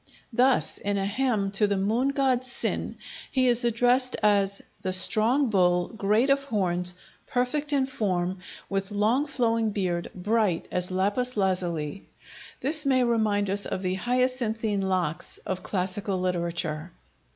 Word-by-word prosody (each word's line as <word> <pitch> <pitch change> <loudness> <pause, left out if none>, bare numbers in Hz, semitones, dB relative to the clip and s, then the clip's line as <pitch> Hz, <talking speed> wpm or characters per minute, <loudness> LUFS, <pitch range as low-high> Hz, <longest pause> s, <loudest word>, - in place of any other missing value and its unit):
Thus, 255 +3 +2
in 205 0 -2
a 195 - -1
hymn 210 -2 -1
to 205 +1 +3
the 200 -1 -1
moon 220 +7 0
god 270 -3 +1
Sin, 255 -1 -3 0.3
he 260 -1 +1
is 240 -1 +2
addressed 245 +2 +2
as 200 -1 +2 0.2
the 185 -1 -2
"strong 230 +7 +5
bull, 180 -2 +2
great 220 +5 +1
of 275 0 +2
horns, 180 -7 0 0.3
perfect 285 +4 -1
in 275 -2 +2
form, 185 -7 -2 0.3
with 195 0 -3
long 220 +8 +1
flowing 230 -5 0
beard, 180 -4 -2
bright 205 -1 0
as 180 0 -2
lapis 205 +7 0
lazuli." 180 -4 -2 0.5
This 300 +2 +7
may 260 -3 +2
remind 215 -4 +1
us 200 +1 +3
of 190 - -4
the 185 0 -1
"hyacinthine 235 -2 -1
locks" 185 -5 -2
of 185 -1 -4
classical 190 0 -3
literature. 170 -2 -3
205 Hz, 140 wpm, -26 LUFS, 185-250 Hz, 0.5 s, This